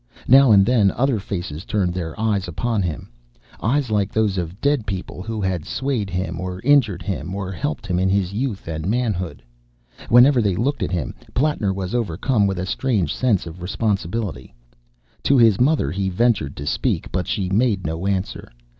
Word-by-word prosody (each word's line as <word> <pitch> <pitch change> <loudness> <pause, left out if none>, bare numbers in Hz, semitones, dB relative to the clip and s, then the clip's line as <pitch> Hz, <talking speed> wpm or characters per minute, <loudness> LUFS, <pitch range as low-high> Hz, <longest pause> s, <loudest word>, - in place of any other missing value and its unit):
Now 135 -1 +7
and 100 -2 +6
then 110 -4 +4
other 125 +3 0
faces 90 -5 -5
turned 95 -4 0
their 85 0 -5
eyes 105 -4 0
upon 110 +6 -1
him: 85 -9 -4 0.5
eyes 125 +1 0
like 105 -1 +1
those 110 -3 +1
of 90 +3 -5
dead 140 -4 +1
people 95 -2 -5
who 110 +2 -4
had 95 -4 -1
swayed 130 - -2
him, 90 +1 -3
or 90 0 -4
injured 125 -10 +3
him, 95 -2 -4
or 95 -1 -4
helped 85 -1 -3
him 90 -2 0
in 95 +1 +2
his 95 -1 0
youth 110 -4 -3
and 80 0 -4
manhood. 105 - -2 0.7
Whenever 125 +2 +6
they 100 -4 +1
looked 135 +9 -1
at 90 -1 -1
him, 85 -9 -2 0.2
Plattner 135 -8 +1
was 95 0 -4
overcome 110 0 +1
with 95 -1 -2
a 90 - -2
strange 105 -1 0
sense 120 -8 +1
of 85 +1 -9
responsibility. 100 - -2 0.7
To 140 - +4
his 115 -5 +5
mother 140 - +2
he 95 +2 -1
ventured 95 - +1
to 70 - -6
speak; - - -1
but 90 - -2
she 95 -5 -1
made 100 -2 +1
no 80 +4 -2
answer. 95 -1 -2
100 Hz, 180 wpm, -21 LUFS, 90-115 Hz, 0.7 s, Now